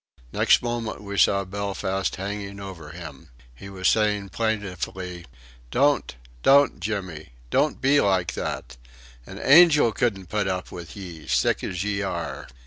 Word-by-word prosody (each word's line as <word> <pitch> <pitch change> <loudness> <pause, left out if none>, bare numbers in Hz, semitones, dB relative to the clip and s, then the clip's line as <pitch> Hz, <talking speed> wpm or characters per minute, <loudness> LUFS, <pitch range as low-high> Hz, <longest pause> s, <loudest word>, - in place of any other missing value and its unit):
Next - - +4
moment 120 -2 -3
we 100 0 -6
saw 100 0 +3
Belfast 95 0 -2
hanging 100 +1 -5
over 95 -6 -8
him. 80 -4 -10 0.2
He 95 +11 -11
was 95 -1 -1
saying 105 -2 +2
plaintively: 95 -5 -3 0.4
"Don't! 140 - +2 0.3
Don't, 140 - +5
Jimmy! 90 - -5 0.2
Don't 150 - +1
be 140 +2 +4
like 95 -3 +1
that. - - -5 0.5
An 95 - -9
angel 150 -2 +6
couldn't 100 -4 -1
put 105 +2 -1
up 95 -1 -3
with 85 -4 -9
ye 85 -6 -9
sick - - +1
as 90 0 -3
ye 105 -1 -1
are." 85 -4 -4
100 Hz, 140 wpm, -24 LUFS, 90-105 Hz, 0.5 s, angel